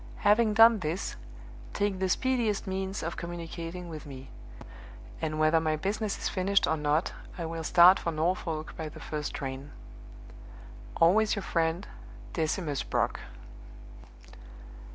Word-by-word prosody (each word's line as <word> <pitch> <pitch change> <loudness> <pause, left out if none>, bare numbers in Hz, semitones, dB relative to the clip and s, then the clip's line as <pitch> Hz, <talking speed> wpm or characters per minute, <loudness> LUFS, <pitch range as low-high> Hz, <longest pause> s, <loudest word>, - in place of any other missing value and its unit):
Having 210 +1 +4
done 225 0 +7
this, 170 +2 -3 0.6
take 200 -2 -1
the 190 0 0
speediest 235 -2 0
means 190 0 -3
of 170 +1 -4
communicating 170 +1 -6
with 155 -3 -8
me; 135 -1 -10 0.9
and 155 -1 -2
whether 155 +1 +4
my 155 -1 0
business 205 +5 -2
is - - -2
finished 195 +1 +2
or 160 - +1
not, 150 +2 0 0.2
I 170 - -3
will 165 0 -4
start 180 +3 +7
for 170 - -2
Norfolk 160 -1 -2
by 160 -1 -5
the - - -12
first 150 -1 -4
train. 135 +1 -5 1.3
"Always 210 +6 +4
your 200 - -4
friend, 165 +3 0 0.5
DECIMUS 155 -3 -1
BROCK." - - -1
170 Hz, 130 wpm, -29 LUFS, 155-195 Hz, 1.3 s, done